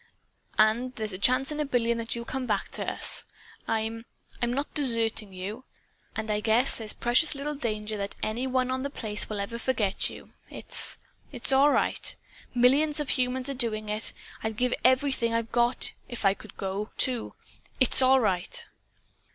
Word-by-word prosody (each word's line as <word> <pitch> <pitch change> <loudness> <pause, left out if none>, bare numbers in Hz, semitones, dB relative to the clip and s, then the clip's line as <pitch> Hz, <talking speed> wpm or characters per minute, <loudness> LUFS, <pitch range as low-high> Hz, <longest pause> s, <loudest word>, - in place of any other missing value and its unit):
And 235 +4 +3
there's 215 -3 -3
a 185 - -6
chance 255 +6 +2
in 300 - -4
a - - +2
billion 235 -3 0
that 230 0 -4
you'll 235 0 -5
come 260 +1 -3
back - - -1
to - - -3
us. - - +4 0.4
I'm 225 +1 -2 0.4
I'm 240 0 +1
not 280 +4 -3
deserting 230 -7 +3
you. 195 +7 -6 0.5
And 220 -1 -3
I 210 - +1
guess 225 +5 +3
there's 220 -2 -3
precious 250 +6 +2
little 290 +2 -3
danger 215 -5 -3
that 200 0 -4
any 235 +4 -1
one 255 0 0
on 260 0 -1
The 280 - -3
Place 215 -6 -1
will 210 -2 -3
ever 215 +4 -4
forget 225 -6 0
you. - - -12 0.2
It's - - +1 0.3
it's 250 -1 0
all 275 +2 +6
right. - - 0 0.4
Millions 285 +5 +4
of 295 - -3
humans 255 +1 0
are 280 - -2
doing 220 -4 -2
it. 215 +1 +2 0.3
I'd 220 -1 -3
give 250 +1 +1
everything 255 -3 +2
I've 230 0 -2
got, 240 +1 +1 0.2
if 240 -4 -5
I 195 - +5
could 205 0 -14
go, 195 +2 -3
too. 250 -3 +1 0.4
IT'S 260 0 +5
ALL 260 +1 +6
RIGHT!" 190 -7 -1
235 Hz, 180 wpm, -27 LUFS, 215-260 Hz, 0.5 s, all